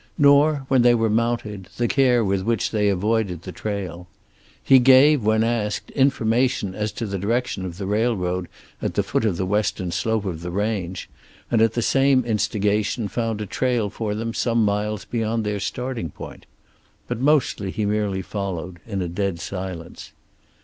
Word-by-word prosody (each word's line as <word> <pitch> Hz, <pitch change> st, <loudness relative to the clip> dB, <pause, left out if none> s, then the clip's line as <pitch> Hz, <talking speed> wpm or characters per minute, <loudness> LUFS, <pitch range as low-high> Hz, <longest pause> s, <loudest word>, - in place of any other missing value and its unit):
Nor, 145 Hz, 0 st, +4 dB
when 130 Hz, -2 st, +4 dB
they 120 Hz, 0 st, +5 dB
were 115 Hz, -2 st, +1 dB
mounted, 110 Hz, -4 st, -1 dB
the 120 Hz, -, +1 dB
care 125 Hz, -4 st, +3 dB
with 95 Hz, -1 st, 0 dB
which 115 Hz, +1 st, 0 dB
they 105 Hz, -2 st, +2 dB
avoided 100 Hz, -3 st, 0 dB
the 95 Hz, -, -7 dB
trail. 90 Hz, -4 st, -5 dB, 0.6 s
He 135 Hz, -, +7 dB
gave, 135 Hz, +3 st, +6 dB
when 110 Hz, +1 st, +3 dB
asked, 115 Hz, -3 st, -2 dB
information 125 Hz, -5 st, +1 dB
as 105 Hz, +2 st, -2 dB
to 115 Hz, -, -4 dB
the 100 Hz, -2 st, -3 dB
direction 115 Hz, -1 st, -1 dB
of 90 Hz, -2 st, -6 dB
the 95 Hz, -, -4 dB
railroad 95 Hz, -4 st, 0 dB, 0.3 s
at -, -, -2 dB
the -, -, +2 dB
foot -, -, -1 dB
of 100 Hz, -6 st, 0 dB
the 95 Hz, -, -1 dB
western 95 Hz, -2 st, -1 dB
slope 110 Hz, +2 st, -1 dB
of 85 Hz, -4 st, -4 dB
the 90 Hz, -, -5 dB
range, 95 Hz, -2 st, -2 dB, 0.4 s
and 115 Hz, -, +3 dB
at 115 Hz, 0 st, +3 dB
the 120 Hz, -, -1 dB
same 135 Hz, -1 st, +3 dB
instigation 105 Hz, -1 st, 0 dB
found 115 Hz, -2 st, -2 dB
a -, -, -3 dB
trail 120 Hz, -1 st, -1 dB
for 105 Hz, -2 st, -3 dB
them 115 Hz, +1 st, -3 dB
some 115 Hz, -2 st, +1 dB
miles 105 Hz, -1 st, -1 dB
beyond 115 Hz, -1 st, -1 dB
their 105 Hz, -1 st, -2 dB
starting 115 Hz, -1 st, -3 dB
point. -, -, -11 dB, 0.6 s
But -, -, -3 dB
mostly 130 Hz, -8 st, +2 dB
he 105 Hz, +2 st, -2 dB
merely 100 Hz, -2 st, -1 dB
followed, 95 Hz, -3 st, -5 dB
in 100 Hz, -4 st, -2 dB
a -, -, -3 dB
dead 90 Hz, 0 st, -2 dB
silence. 90 Hz, -2 st, -7 dB
105 Hz, 175 wpm, -23 LUFS, 95-120 Hz, 0.6 s, He